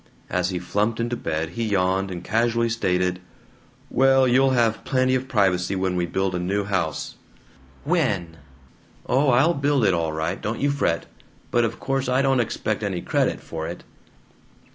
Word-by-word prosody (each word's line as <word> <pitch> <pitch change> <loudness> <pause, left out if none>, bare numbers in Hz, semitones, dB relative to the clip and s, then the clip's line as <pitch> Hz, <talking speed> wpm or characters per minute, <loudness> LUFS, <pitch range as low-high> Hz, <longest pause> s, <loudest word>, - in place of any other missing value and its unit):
As 90 0 0
he 90 - -2
flumped 105 +6 -1
into 120 +1 -1
bed 80 -7 -3
he 115 +7 -4
yawned, 95 -2 +1
and 90 -1 -6
casually 115 +3 +1
stated: 90 -5 0 0.7
"Well, 135 0 +4
you'll 130 +2 +4
have 115 -3 +1
plenty 130 -1 +1
of 130 0 -1
privacy 95 -5 +1
when 95 -1 -1
we 90 -1 0
build 95 +2 -1
a 90 - -1
new 100 +3 -1
house. 95 -6 -2 0.7
"When?" 105 - 0 0.7
"Oh, 135 +2 +2
I'll 135 +7 +4
build 140 -4 +1
it 95 - +4
all 85 -2 0
right, 80 +1 -3
don't 110 +2 -3
you 140 0 +1
fret! 85 - 0 0.5
But 120 -1 +3
of 115 0 -4
course 135 -1 -1
I 130 +2 +2
don't 135 -1 +3
expect 110 -2 -1
any 95 -4 -2
credit - - 0
for 80 -1 -5
it." - - -7
105 Hz, 170 wpm, -23 LUFS, 90-130 Hz, 0.7 s, Well